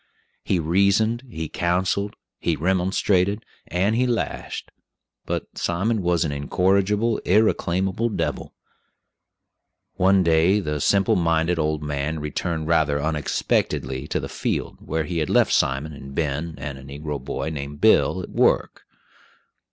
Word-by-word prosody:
He 95 - +1
reasoned, 100 +7 +2
he 80 -8 -4
counseled, 95 +5 0 0.2
he 85 - 0
remonstrated, 95 +4 +1 0.2
and 95 +5 +1
he 125 +2 +2
lashed; 120 -3 -3 0.6
but - - -2
Simon 100 +6 0
was 85 -2 +1
an 75 - -2
incorrigible, 100 +9 +1
irreclaimable 95 +1 +1
devil. 80 -8 -3 1.4
One 95 +1 +4
day 85 +4 +4
the 75 -6 -3
simple 100 +4 +3
minded 85 0 +1
old 75 -1 0
man 75 +2 -2
returned 80 +2 -3
rather 75 -3 +2
unexpectedly 75 -3 -1
to - - -1
the - - -4
field, - - -3
where 80 +1 -2
he 85 +2 -3
had 75 - -1
left - - +3
Simon 70 +3 +1
and 70 -1 -10
Ben 80 +1 -2
and 70 0 -6
a - - -12
negro 70 0 -6
boy 80 - -3
named 70 -1 -6
Bill - - +4
at - - -8
work. - - +1
85 Hz, 135 wpm, -23 LUFS, 75-95 Hz, 1.4 s, One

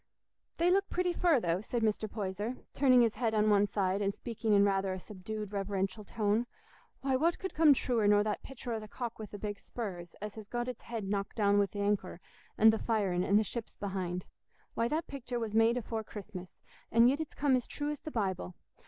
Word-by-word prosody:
"They 345 +1 +3
look 395 +1 +2
pretty 360 -1 0
fur, 340 -6 +3
though," 175 -3 0
said 230 +1 -2
Mr. 215 0 0
Poyser, 210 +3 -3 0.2
turning 255 -3 +5
his 230 -2 +3
head 225 -3 0
on 215 0 +4
one 205 0 +4
side 195 -1 0
and 200 0 +1
speaking 225 +1 -3
in 200 0 +6
rather 195 -1 +1
a 185 - -5
subdued 210 +2 -6
reverential 195 0 -2
tone. 215 +3 0 0.5
"Why, 270 -1 +1
what 330 +6 +2
could 380 - -5
come 305 -3 +6
truer 235 -5 +1
nor 205 0 +5
that 210 -1 -2
pictur 250 -2 -6
o' 225 - -2
the 215 - -9
cock 235 +1 -5
wi' 215 - -5
the 205 - -8
big 205 0 -4
spurs, 180 -7 -6
as 210 0 -5
has 215 -2 -10
got 240 +2 -2
its 250 - -5
head 230 -2 -5
knocked 200 0 -2
down 205 -2 +3
wi' 200 - +3
th' 195 - -21
anchor, 205 -3 -1 0.4
an' 220 +1 +8
th' 220 - -2
firin', 195 -6 +1
an' 200 +2 +4
the 215 - +4
ships 230 +2 -6
behind? 185 -3 -3 0.5
Why, 230 - +1
that 310 +6 -1
pictur 255 -3 -5
was 225 -2 -3
made 225 +2 +4
afore 225 -2 -3
Christmas, 200 -4 -9 0.3
and 230 +1 +6
yit 280 +5 +2
it's 315 - -6
come 280 -2 +3
as 250 - -1
true 295 0 -3
as 300 - -5
th' 310 - -7
Bible. 190 - -2
215 Hz, 225 wpm, -32 LUFS, 200-245 Hz, 0.5 s, an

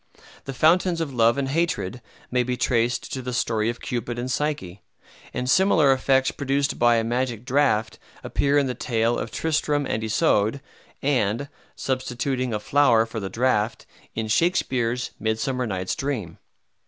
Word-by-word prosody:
The 135 - -5
fountains 170 +4 +3
of 155 -5 -3
Love 115 +1 +3
and 135 -1 -1
Hatred 145 - -1 0.3
may 125 0 +2
be 125 0 -2
traced 120 0 0
to 130 - -3
the 125 0 -5
story 115 -2 0
of 120 - -4
Cupid 120 -1 -3
and 125 +1 -3
Psyche; 125 -11 -2 0.5
and 125 - -3
similar 165 -3 +4
effects 130 0 +2
produced 140 0 -1
by 120 0 +5
a 115 - +1
magic 120 0 -2
draught 130 -5 +1 0.2
appear 140 +1 +1
in 140 - +3
the 130 - -2
tale 115 -1 0
of 115 - -3
Tristram 150 0 0
and 110 -3 -2
Isoude, 110 +2 +2 0.4
and, 135 -1 0 0.3
substituting 130 0 -2
a 105 - -1
flower 120 -2 +3
for 115 0 -6
the 95 -2 -4
draught, 115 0 0 0.3
in 110 0 -2
Shakspeare's 125 -3 +1
"Midsummer 120 +3 -1
Night's 95 -3 -2
Dream." 120 - -4
125 Hz, 155 wpm, -24 LUFS, 115-140 Hz, 0.5 s, by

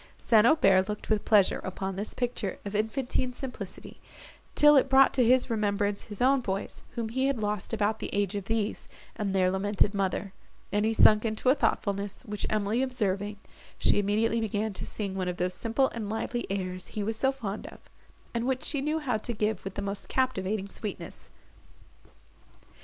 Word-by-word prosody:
St. 225 -1 +4
Aubert 195 -9 +4
looked 210 +1 -5
with 215 -1 +1
pleasure 205 -4 +4
upon 190 0 -4
this 205 +3 -5
picture 240 -5 -2
of 200 - -5
infantine 250 +3 -1
simplicity, 240 -7 -7 0.6
till 295 0 +7
it 270 -1 +4
brought 270 0 +6
to 255 - +3
his 250 +2 +4
remembrance 205 -2 0
his 210 +1 -3
own 270 +1 +4
boys, 195 -3 -4
whom 230 -2 -2
he 260 +4 0
had 275 -2 0
lost 210 -3 -3
about 215 -1 0
the - - -4
age 200 -1 0
of 200 -2 -4
these, 225 -1 -2 0.3
and 200 -3 -2
their 185 -1 +3
lamented 200 +1 +1
mother; 195 0 -2 0.4
and 205 +1 +1
he 225 - +2
sunk 215 -1 +6
into 225 +2 0
a - - +7
thoughtfulness, 205 -6 -1
which 210 -4 -4
Emily 215 +3 0
observing, 205 -5 -1 0.4
she - - +3
immediately 220 +3 +1
began 215 0 -1
to - - -6
sing 200 -3 -4
one 190 -1 -2
of 180 0 -3
those 180 +1 -1
simple 230 +8 +1
and 220 -3 -5
lively 240 +2 -3
airs 185 -2 -3
he 210 - -4
was 220 +2 -2
so 265 +4 +2
fond 215 -6 -5
of, - - -11 0.6
and 235 +1 -1
which 260 -1 0
she 285 -2 0
knew 305 +3 0
how 275 -8 -1
to 235 +3 -4
give 210 -2 -1
with 190 0 -6
the 200 - -3
most 200 0 -5
captivating 210 -6 0
sweetness. 205 +1 -8
215 Hz, 185 wpm, -28 LUFS, 200-240 Hz, 0.6 s, till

